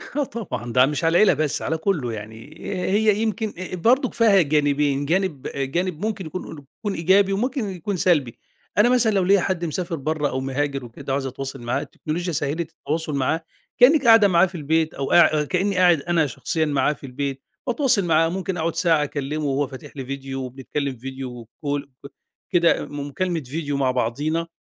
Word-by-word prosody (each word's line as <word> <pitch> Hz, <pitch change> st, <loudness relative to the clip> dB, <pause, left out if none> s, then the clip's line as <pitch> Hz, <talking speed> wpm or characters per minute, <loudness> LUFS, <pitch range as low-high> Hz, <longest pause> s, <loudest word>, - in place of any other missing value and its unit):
آه 290 Hz, -, +2 dB
طبعًا، 210 Hz, -, -5 dB
ده 130 Hz, 0 st, +6 dB
مش 150 Hz, +3 st, -2 dB
على 165 Hz, -, +3 dB
العيلة 190 Hz, +2 st, +5 dB
بس، 150 Hz, -1 st, -1 dB
على 160 Hz, -, -1 dB
كُلّه 160 Hz, -, -1 dB
يعني 110 Hz, +7 st, -9 dB, 0.3 s
هي 210 Hz, +1 st, +3 dB
يمكن 220 Hz, -1 st, -1 dB, 0.2 s
برضك 245 Hz, +8 st, +2 dB
فيها 210 Hz, -5 st, +5 dB
جانبين، 145 Hz, -2 st, +1 dB
جانب 170 Hz, -3 st, -1 dB
جانب 165 Hz, +7 st, -2 dB
ممكن 205 Hz, -4 st, -3 dB
يكون 155 Hz, -3 st, -7 dB, 0.2 s
كون 205 Hz, -3 st, -2 dB
إيجابي 195 Hz, +4 st, +3 dB
وممكن 245 Hz, +1 st, -1 dB
يكون 190 Hz, +1 st, -4 dB
سلبي، 150 Hz, -10 st, +1 dB, 0.4 s
أنا 210 Hz, +4 st, +5 dB
مثلًا 245 Hz, -3 st, +3 dB
لو 195 Hz, -2 st, +2 dB
ليّا 195 Hz, +1 st, +4 dB
حد 175 Hz, -2 st, -1 dB
مسافر 170 Hz, +2 st, -3 dB
برّه، 150 Hz, 0 st, -1 dB
أو 130 Hz, -, -2 dB
مهاجر 135 Hz, 0 st, -2 dB
وكده 120 Hz, +3 st, -6 dB
وعايز 135 Hz, 0 st, -1 dB
أتواصل 135 Hz, 0 st, -6 dB
معاه، 120 Hz, +1 st, -1 dB
التكنولوجيا 175 Hz, +3 st, -4 dB
سهِّلِت 155 Hz, +3 st, -2 dB
التواصل 160 Hz, -1 st, -3 dB
معاه 140 Hz, +5 st, 0 dB, 0.4 s
كأنِّك 270 Hz, +2 st, +6 dB
قاعدة 225 Hz, -3 st, +7 dB
معاه 175 Hz, -1 st, +5 dB
في 185 Hz, 0 st, -8 dB
البيت 160 Hz, 0 st, 0 dB
أو 135 Hz, 0 st, -3 dB
قاع 155 Hz, -3 st, +5 dB
كأني 190 Hz, +6 st, 0 dB
قاعد 175 Hz, -4 st, +5 dB
أنا 170 Hz, -1 st, +1 dB
شخصيًا 160 Hz, +5 st, -1 dB
معاه 150 Hz, 0 st, +1 dB
في 145 Hz, -, -12 dB
البيت، 135 Hz, +1 st, -4 dB, 0.3 s
وأتواصل 245 Hz, -5 st, +2 dB
معاه 165 Hz, -1 st, +3 dB
ممكن 190 Hz, +1 st, -3 dB
أقعد 165 Hz, 0 st, -1 dB
ساعة 165 Hz, -3 st, +3 dB
أكلّمه 150 Hz, +1 st, -3 dB
وهو 140 Hz, 0 st, 0 dB
فاتح 130 Hz, -1 st, -10 dB
لي 135 Hz, -, -5 dB
فيديو 135 Hz, 0 st, -5 dB
وبنتكلم 135 Hz, +2 st, -4 dB
فيديو، 125 Hz, -2 st, -7 dB, 0.2 s
وcall 140 Hz, -1 st, -4 dB, 0.4 s
كده 170 Hz, -2 st, +3 dB
مكالمة 145 Hz, +4 st, -3 dB
فيديو 145 Hz, +2 st, -3 dB
مع 135 Hz, -2 st, +2 dB
بعضينا 145 Hz, +7 st, -1 dB
155 Hz, 180 wpm, -23 LUFS, 140-185 Hz, 0.4 s, قاعدة